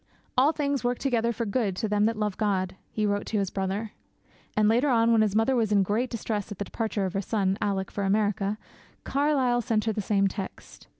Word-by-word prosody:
'All 270 +4 +5
things 285 -4 -1
work 245 0 0
together 235 -4 +1
for 230 0 -3
good 205 -2 0
to 220 +4 -2
them 210 0 +2
that 225 0 0
love 210 -2 -1
God,' 190 -4 0
he 215 - -1
wrote 205 0 -1
to 220 - -1
his 195 -2 -1
brother. 195 +3 -2 0.7
And, 215 -1 +4
later 240 +6 +3
on, 230 -2 +4
when 225 -1 +5
his 210 -2 +1
mother 225 +4 +3
was 225 -3 +1
in 200 -2 +4
great 220 +6 0
distress 215 -3 -3
at 205 - -6
the 205 - -3
departure 220 -3 -2
of 185 - -3
her 195 - 0
son, 195 -2 0
Alick, 195 -2 -1
for 200 - -3
America, 205 0 +1 0.5
Carlyle 270 -4 +1
sent 225 -3 0
her 220 - +1
the 210 - -2
same 195 0 +2
text. 195 0 -8
215 Hz, 225 wpm, -27 LUFS, 200-235 Hz, 0.7 s, All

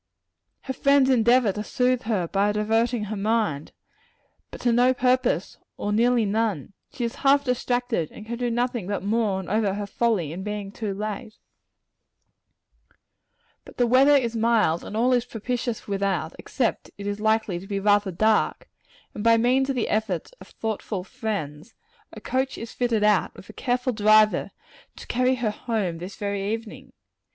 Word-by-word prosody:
Her 265 - -4
friends 275 0 +3
endeavor 240 -2 +4
to 210 +2 -5
soothe 250 +1 0
her 205 -7 0
by 200 +3 +1
diverting 225 +2 +1
her 210 +1 -4
mind 205 -8 -1 0.8
but - - -10
to 240 - +2
no 250 +2 +4
purpose, 255 0 +1 0.2
or 205 - -2
nearly 235 +1 +3
none: 205 -5 -1 0.2
she 245 - -5
is 235 - -3
half 280 +1 +4
distracted, 245 - -1
and 215 - -11
can 235 +2 -5
do 245 -1 0
nothing 240 -4 -1
but 200 -1 -3
mourn 205 -3 0
over 205 -1 0
her 205 0 -3
folly 200 -7 0
in 180 - -6
being 205 -1 -5
so 220 - -5
late. 210 +2 -5 2.3
But - - -15
the 245 - +3
weather 265 +4 +5
is 235 -3 -1
mild, 225 -7 +2
and 215 - -6
all 250 +3 +3
is 245 -1 +2
propitious 240 0 -4
without, 195 -5 -1
except 245 -5 -2
that - - -18
it 200 - -7
is 205 0 -3
likely 220 -4 +1
to 190 - -11
be 200 -1 -2
rather 205 0 +3
dark; 215 +5 +1 0.5
and 205 - -6
by 230 0 +5
means 255 +4 +2
of 270 - 0
the 240 - 0
efforts 215 -6 -2
of - - -12
thoughtful 215 -3 -4
friends, 160 -8 -5 0.4
a - - -10
coach 260 +1 -2
is 230 0 -7
fitted 235 -4 0
out 210 -2 +2
with - - -14
a - - -10
careful 250 0 -1
driver, 215 0 +4 0.5
to - - -11
carry 255 +1 +1
her 240 -4 -1
home 210 -7 -3
this 185 +3 -7
very 200 -1 -2
evening. 225 -1 -6
220 Hz, 170 wpm, -24 LUFS, 200-245 Hz, 2.3 s, weather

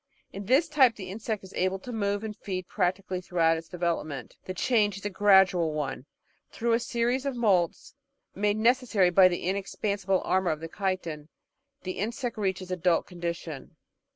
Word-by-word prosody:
In 200 0 -6
this 275 +7 +4
type 270 -7 +4
the 190 -3 -7
insect 215 0 -4
is 190 - -12
able 185 +1 0
to 245 +6 -9
move 205 -2 -1
and 215 -1 -5
feed 185 -3 -5
practically 185 -1 -1
through 180 -1 -3
out 165 0 +5
its 165 0 -7
development; 170 -5 -3
the 185 - -4
change 210 -2 +2
is 200 - -10
a 205 - -1
gradual 190 -5 +4
one. 145 -2 -4 0.4
Through 235 0 0
a 230 - +3
series 240 +2 0
of 275 -2 -2
moults, 195 -7 +1 0.4
made 205 +1 0
necessary 225 -5 +3
by 185 +1 +7
the 175 -1 -2
inexpansible 195 0 -1
armour 190 -1 +1
of 155 0 -2
chitin, 165 -4 -3 0.6
the 185 0 -5
insect 235 +4 -3
reaches 190 -2 -2
the - - -1
adult 175 -1 +1
condition. 170 -5 -6
190 Hz, 175 wpm, -28 LUFS, 180-215 Hz, 0.6 s, by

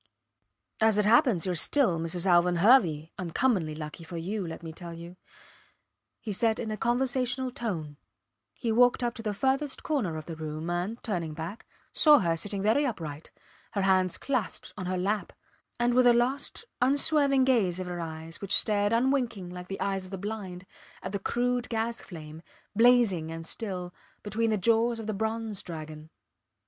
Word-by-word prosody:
As 220 -1 +4
it 210 - +2
happens 230 - +4
you 185 - 0
are - - 0
still 180 - +4
Mrs. 165 +2 +1
Alvan 175 -1 +4
Hervey 170 - +4
uncommonly 180 -2 0
lucky 155 +2 -7
for 170 +1 -7
you, 190 +3 -3
let 165 - -8
me 160 -1 -7
tell 170 0 -8
you, 170 +2 -10 1.0
he 215 - -5
said 220 +2 +1
in 225 -2 -4
a - - -2
conversational 250 +2 0
tone. 165 - -4 0.6
He 230 - -2
walked 245 +2 +4
up 240 -1 0
to 235 - -8
the 210 -2 -3
furthest 270 +5 -1
corner 265 - -1
of 155 - -7
the 165 - -6
room, 155 +1 -5
and, 180 +6 -2
turning 170 -8 -3
back, 165 +7 -7 0.3
saw 300 -2 +6
her 170 -8 +1
sitting 195 +3 -2
very 220 +8 +3
upright, 160 - -5 0.4
her 200 - 0
hands 185 -2 +2
clasped 255 -8 -3
on 185 -3 -5
her 185 0 -1
lap, 200 +3 -1 0.5
and 240 0 +2
with 250 0 +5
a 240 - +7
lost, 255 - 0 0.2
unswerving 280 +1 +3
gaze 215 -9 +2
of 185 - -3
her 175 -1 -5
eyes 160 0 -6
which 200 -1 +2
stared 205 0 +2
unwinking 235 -7 0
like 180 0 -8
the 195 - -6
eyes 195 -1 -1
of - - -11
the 195 - -5
blind, 195 -2 -6 0.4
at - - -4
the 200 - -2
crude 245 +4 -1
gas 230 +1 -2
flame, 160 -3 -10 0.3
blazing 225 -9 +4
and 165 0 -6
still, 180 -2 -4 0.3
between 220 +2 0
the 215 - +1
jaws 230 +3 +2
of 225 - -6
the 215 - -2
bronze 220 0 -3
dragon. 155 -2 -8
200 Hz, 180 wpm, -28 LUFS, 170-240 Hz, 1.0 s, a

